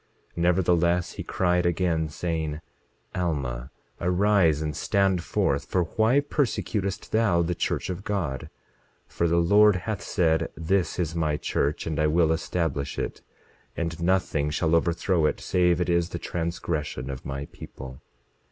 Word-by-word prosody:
27:13 - - -29
Nevertheless 85 0 +2
he - - -6
cried 90 -1 +1
again, 85 -2 +1
saying: 80 -1 -3 0.5
Alma, 70 -9 -2 0.3
arise 90 -3 +3
and 75 -2 -3
stand 95 -3 +1
forth, 70 -4 0
for 90 - +1
why 110 - +2
persecutest 115 -9 -2
thou 105 -6 +3
the 85 +1 -1
church 85 - -2
of 90 +1 -5
God? 85 -12 -3 0.6
For 85 - -1
the 85 +1 +2
Lord 100 +4 +5
hath 95 +1 -3
said: 80 -4 +1
This 85 +1 0
is 80 -3 -1
my 80 -3 0
church, 75 0 -1
and 80 -3 -2
I 75 - +3
will 80 +1 +3
establish 80 -3 -2
it; - - -4 0.6
and 85 -1 -3
nothing 85 -5 +1
shall 80 +2 0
overthrow 85 0 +2
it, - - -1
save 90 -1 +2
it 90 - 0
is 85 -1 +1
the 85 - -4
transgression 80 -6 -3
of 65 - -7
my 70 +1 -4
people. 65 +1 -10
85 Hz, 150 wpm, -26 LUFS, 80-90 Hz, 0.6 s, Lord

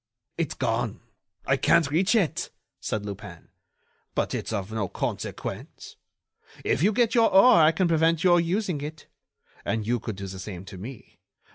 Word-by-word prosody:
"It's - - -2
gone! - - -1 0.5
I 135 - +2
can't 160 0 +3
reach 185 +9 +2
it," 195 -9 +1 0.3
said 105 -1 -3
Lupin. 100 -4 -9 0.7
"But - - 0
it's - - -3
of 100 -1 -3
no 110 -3 -1
consequence. - - -5 0.7
If - - +1
you 200 +5 +4
get 230 +1 +2
your 230 -2 +4
oar 195 -1 +7
I 155 +1 +6
can 175 +3 +1
prevent 165 +1 +2
your 175 -1 +5
using 180 -2 -1
it. 150 +1 -7 0.6
And 110 -2 -2
you 120 +2 0
could 110 -1 -5
do 100 +1 -6
the 95 0 -7
same 95 -1 -7
to 95 - -10
me. 120 +4 -10
150 Hz, 165 wpm, -26 LUFS, -, 0.7 s, oar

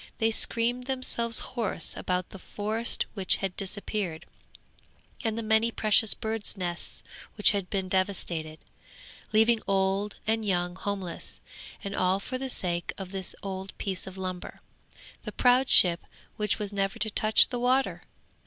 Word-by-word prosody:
They 225 -1 +2
screamed 240 +2 +2
themselves 245 -3 +3 0.2
hoarse 220 -9 -2
about 180 -1 -2
the 195 - -10
forest 215 +5 -1
which 190 -4 +1
had 195 -2 -3
disappeared, 195 -3 -3 1.0
and 225 -1 -1
the 230 - -2
many 220 +1 +3
precious 215 -1 +5
birds' 220 -2 -3
nests 175 -2 -4 0.3
which 210 - +5
had 200 -3 -2
been 190 -2 -2
devastated, 180 -5 -2 0.7
leaving 220 +1 +4
old 195 +1 +1
and 225 +1 +1
young 180 -3 0
homeless; 195 -3 -4 0.4
and 200 -1 -4
all 185 +1 +2
for 255 +5 -5
the 265 0 -4
sake 175 -7 -2
of 190 -2 -7
this 190 -2 -3
old 190 0 -6
piece 190 -1 -4
of 190 0 -9
lumber, 185 -1 -6 0.6
the - - -6
proud 250 +1 +3
ship 175 -2 +5 0.3
which 210 0 0
was 210 -1 -4
never 195 -1 -1
to 220 +1 -2
touch 215 +2 +4
the 245 - -3
water! 255 +2 +1
200 Hz, 150 wpm, -28 LUFS, 185-225 Hz, 1.0 s, precious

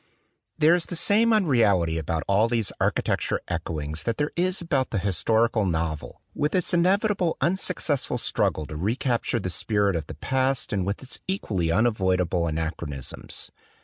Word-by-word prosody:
There 160 +1 +5
is 175 -1 0
the 175 - -5
same 220 +7 +3
unreality 110 - +3
about 80 +1 -2
all 100 +3 +3
these 115 -4 0
architecture - - 0
echoings 75 -1 -3
that 115 - -1
there 145 0 -1
is 180 +1 +1
about 140 -6 0
the 110 - -2
historical 110 +5 +2
novel 80 -4 -3
with 150 +5 -1
its 180 0 +1
inevitably 185 0 +2
unsuccessful 170 -6 0
struggle 80 - 0
to 75 - -8
recapture 115 - 0
the 95 -3 -3
spirit 100 +1 +1
of 80 -3 -3
the - - -8
past 130 -1 0
and 95 -2 -1
with 100 +6 -3
its 130 - -6
equally 100 - -1
unavoidable 95 -5 +1
anachronisms. 80 -4 -4
110 Hz, 150 wpm, -25 LUFS, -, -, There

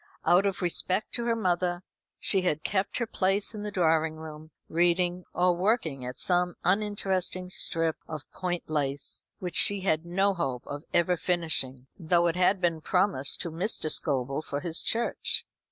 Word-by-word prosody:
Out 180 +4 +4
of 195 -1 -3
respect 180 +3 +1
to 235 - 0
her 230 -1 +1
mother 180 -3 0 0.3
she 190 - +3
had 155 -4 -1
kept 195 -1 -1
her 235 - 0
place 200 -1 0
in 210 - -6
the 210 - -4
drawing 160 -4 +1
room, 155 0 -10 0.2
reading, 175 +1 +1
or 180 0 +2
working 175 - 0
at 125 - -7
some 180 -1 +1
uninteresting 190 -2 0
strip 165 -3 0
of 155 -3 -7
point 175 -2 -4
lace, 145 -2 -2
which 180 -2 -5
she 200 -1 +5
had 160 -4 +1
no 195 +4 +1
hope 135 -9 -3
of 145 +1 -7
ever 175 +1 +2
finishing, 160 -8 -1
though 170 0 +2
it 170 -1 +1
had 185 +2 +3
been 170 -3 0
promised 180 -6 +2
to 170 - -3
Mr. 165 -2 +1
Scobel 135 -1 0
for 145 -2 -4
his 170 -2 +1
church. 235 +1 0
175 Hz, 170 wpm, -28 LUFS, 160-190 Hz, 0.3 s, she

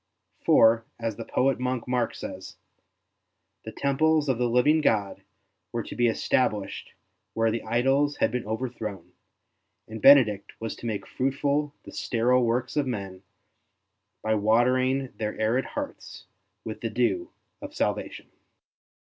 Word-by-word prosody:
For, 115 +1 +5 0.2
as 115 -2 -3
the 115 - -6
poet 135 0 +1
monk 125 -1 -2
Mark 125 -1 0
says, - - -8 0.5
'' - - -53
The 110 - -6
temples 150 +3 +1
of 125 -3 +1
the 120 -1 +1
living 145 +7 +3
God 105 -8 0 0.5
were - - -2
to - - -8
be 120 - +3
established 110 -3 -1 0.4
where 115 0 +2
the 115 - -2
idols 135 +6 +1
had - - +1
been 125 -3 -3
overthrown, 110 -5 -5 0.8
and 110 0 -8
Benedict 115 -8 +6
was 115 -1 -4
to 120 - -6
make 100 -3 -3
fruitful 140 +2 -1
the - - -11
sterile 125 +2 +1
works 120 +2 -1
of 145 -3 +1
men 100 -6 -5 1.0
by 110 - +1
watering 125 +5 +2
their 105 -1 -3
arid 115 +4 +1
hearts 290 -1 -7 0.4
with - - -6
the - - -2
dew 345 -2 0 0.3
of - - -9
salvation." - - -2
120 Hz, 140 wpm, -26 LUFS, 110-135 Hz, 1.0 s, Benedict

